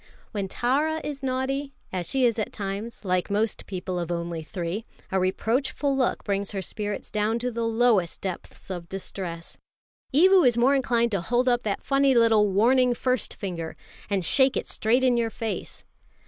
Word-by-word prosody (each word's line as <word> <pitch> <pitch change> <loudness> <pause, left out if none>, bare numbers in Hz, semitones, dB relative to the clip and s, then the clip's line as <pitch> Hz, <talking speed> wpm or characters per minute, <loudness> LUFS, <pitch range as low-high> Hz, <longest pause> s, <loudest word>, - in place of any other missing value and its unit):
When 200 -2 -2
Tara 290 +10 0
is 285 -2 -5
naughty, 270 +1 -2 0.2
as 180 -2 -3
she 265 -2 +2
is 230 -2 +2
at 215 - -2
times, 205 +3 -5
like 185 0 0
most 210 +1 -1
people 185 -1 -3
of 170 0 -3
only 170 -1 -3
three, 175 +4 -4 0.3
a 190 - +2
reproachful 250 +9 0
look 260 -2 0
brings 200 -1 -1
her 195 - -2
spirits 205 +2 -4
down 215 +2 +1
to 245 +1 -2
the 230 0 -2
lowest 225 -6 +2
depths 190 0 -6
of 175 -2 -6
distress. 180 -3 -6 0.5
Evu 370 +6 +6
is 245 -3 +4
more 250 +4 +4
inclined 240 -3 +2
to 200 -4 0
hold 245 +8 +1
up 240 -1 +3
that 200 -2 -2
funny 275 -1 +3
little 225 -3 +5
warning 245 +5 +4
first 255 0 -1
finger, 170 -4 -5 0.3
and 195 -4 0
shake 265 - +4
it - - -3
straight 240 +4 +1
in 250 -2 +4
your 230 -1 +1
face. 225 0 -5
225 Hz, 175 wpm, -26 LUFS, 190-255 Hz, 0.5 s, Evu